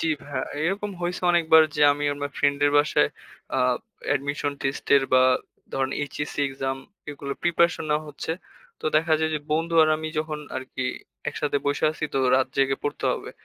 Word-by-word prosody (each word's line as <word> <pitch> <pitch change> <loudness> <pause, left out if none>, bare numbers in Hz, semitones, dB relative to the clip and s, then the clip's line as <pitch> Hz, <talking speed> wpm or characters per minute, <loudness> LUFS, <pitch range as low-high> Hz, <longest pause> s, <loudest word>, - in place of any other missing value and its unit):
জি - - 0 0.2
ভাইয়া, 140 -3 -4 0.2
এরকম 200 +5 -1
হইছে 180 +1 -2
অনেকবার 160 -2 +6
যে 150 - -1
আমি 145 0 -3
আমার 145 0 -4
ফ্রেন্ডের 145 0 +3
বাসায় 140 - +3 0.5
আ - - +2 0.5
অ্যাডমিশন 145 0 -1
টেস্টের 135 0 +2
বা 130 0 +7 0.5
ধরেন 135 0 0 0.2
HSC 150 +2 -5
এক্সাম 135 0 -3 0.3
এগুলো 140 -1 -5
প্রিপারেশন 170 -1 +2
নেওয়া 150 +1 +1
হচ্ছে। 150 +2 -4 0.5
তো - - -12
দেখা 160 0 +3
যায় 160 0 +1
যে - - 0
বন্ধু 165 +2 0
আর 155 - +4
আমি 155 0 -4
যখন 155 -1 -2 0.2
আরকি 130 0 -5 0.5
একসাথে 145 -1 -1
বইসা 145 +2 +1
আছি 155 - -4
তো 135 - +2 0.2
রাত 130 - +2
জেগে 135 0 +2
পড়তে 145 - -3
হবে। - - -6
145 Hz, 170 wpm, -25 LUFS, 140-160 Hz, 0.5 s, বা